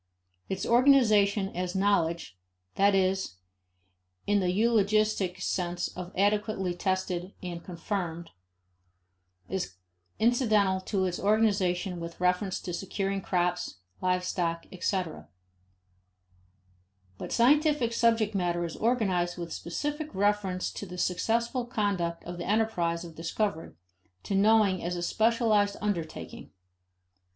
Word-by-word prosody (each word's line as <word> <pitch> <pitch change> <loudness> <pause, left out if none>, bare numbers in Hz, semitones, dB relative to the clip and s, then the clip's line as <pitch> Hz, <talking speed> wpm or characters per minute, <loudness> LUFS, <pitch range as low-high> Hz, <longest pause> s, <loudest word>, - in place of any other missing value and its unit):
Its 190 0 -2
organization 215 -6 +4
as 180 +1 -3
knowledge 170 - +1 0.4
(that 200 0 +4
is, 190 - +1 0.9
in 205 0 +3
the 185 -2 +1
eulogistic 215 -2 +2
sense 175 -1 -2
of 180 0 -8
adequately 205 -2 +1
tested 185 0 -2
and 175 -2 -5
confirmed) 170 -2 -4 1.2
is 185 - -3 0.4
incidental 215 -5 +3
to 190 0 -1
its 180 -1 -2
organization 195 -4 +1
with 170 0 -7
reference 180 +2 +1
to 175 - -6
securing 195 +2 -2
crops, 180 -1 -1 0.3
live 180 0 +1
stock, 170 -2 -2
etc. 180 - -3 1.9
But - - -6
scientific 285 -1 +3
subject 230 -2 +2
matter 175 -3 0
is 165 - -6
organized 190 -7 0
with 170 -2 -5
specific 295 - -4
reference 195 -2 0
to 200 - -7
the 180 0 -8
successful 230 +8 0
conduct 195 -7 -1
of 175 0 -7
the 175 - -4
enterprise 180 -6 0
of 165 - -10
discovery, 165 - -3 0.5
to - - -4
knowing 200 -2 +4
as 175 +1 -2
a 175 - -3
specialized 215 -1 +2
undertaking. 185 -6 -4
190 Hz, 115 wpm, -28 LUFS, 175-215 Hz, 1.9 s, organization